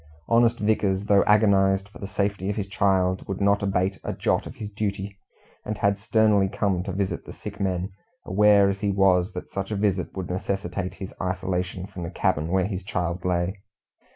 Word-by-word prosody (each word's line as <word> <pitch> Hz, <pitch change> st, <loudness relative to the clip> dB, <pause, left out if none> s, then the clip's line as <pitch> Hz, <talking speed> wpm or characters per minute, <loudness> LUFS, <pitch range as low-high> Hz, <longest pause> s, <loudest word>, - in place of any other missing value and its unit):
Honest 115 Hz, 0 st, +4 dB
Vickers, 105 Hz, -3 st, +1 dB
though 100 Hz, -1 st, +5 dB
agonized 100 Hz, -2 st, +4 dB
for 105 Hz, -, -15 dB
the 100 Hz, -, -5 dB
safety 100 Hz, -1 st, -1 dB
of 105 Hz, -, -1 dB
his 105 Hz, -, -2 dB
child, 95 Hz, -2 st, +1 dB
would 95 Hz, -, -3 dB
not 100 Hz, 0 st, +3 dB
abate 95 Hz, -1 st, 0 dB
a -, -, -3 dB
jot -, -, 0 dB
of -, -, -9 dB
his 110 Hz, -5 st, -6 dB
duty, 100 Hz, -1 st, -4 dB, 0.4 s
and 105 Hz, 0 st, -4 dB
had 100 Hz, 0 st, +1 dB
sternly 105 Hz, -2 st, +3 dB
come 95 Hz, -2 st, 0 dB
to -, -, -3 dB
visit 95 Hz, +1 st, -2 dB
the -, -, -10 dB
sick -, -, -9 dB
men, 95 Hz, -1 st, -1 dB, 0.3 s
aware 100 Hz, +1 st, +5 dB
as 100 Hz, 0 st, -1 dB
he 105 Hz, -, +1 dB
was 95 Hz, -1 st, +3 dB
that 90 Hz, -, -7 dB
such 100 Hz, 0 st, -3 dB
a 110 Hz, -, -2 dB
visit 100 Hz, -3 st, -1 dB
would 95 Hz, -1 st, -4 dB
necessitate 95 Hz, 0 st, -3 dB
his 95 Hz, -, -8 dB
isolation 90 Hz, -1 st, -2 dB
from 95 Hz, -2 st, -9 dB
the 85 Hz, -, -4 dB
cabin 80 Hz, -3 st, 0 dB
where 95 Hz, +1 st, +1 dB
his 95 Hz, -2 st, -3 dB
child 90 Hz, -1 st, -3 dB
lay. 90 Hz, +2 st, -1 dB
95 Hz, 195 wpm, -25 LUFS, 95-100 Hz, 0.4 s, though